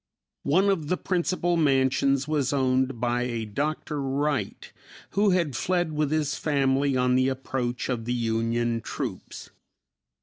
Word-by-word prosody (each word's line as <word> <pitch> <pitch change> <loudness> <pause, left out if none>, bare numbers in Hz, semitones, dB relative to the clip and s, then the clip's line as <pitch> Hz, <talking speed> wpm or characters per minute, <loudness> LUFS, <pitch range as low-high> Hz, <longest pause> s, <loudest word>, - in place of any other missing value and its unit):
One 185 +8 +3
of 170 -7 0
the 180 - 0
principal 175 -1 0
mansions 135 -1 +2
was 145 -4 0
owned 130 -2 +1
by 120 +1 0
a 120 -2 -2
Dr. 145 +6 -3
Wright 140 +2 -2 0.4
who 205 +1 +3
had 170 -8 +1
fled 175 +2 0
with 150 -1 0
his 150 -2 0
family 140 -2 +1
on 125 0 +2
the 130 +1 +3
approach 130 -2 -3
of 120 -3 -2
the 120 - -1
Union 115 0 0
troops. - - -6
135 Hz, 140 wpm, -26 LUFS, 125-155 Hz, 0.4 s, One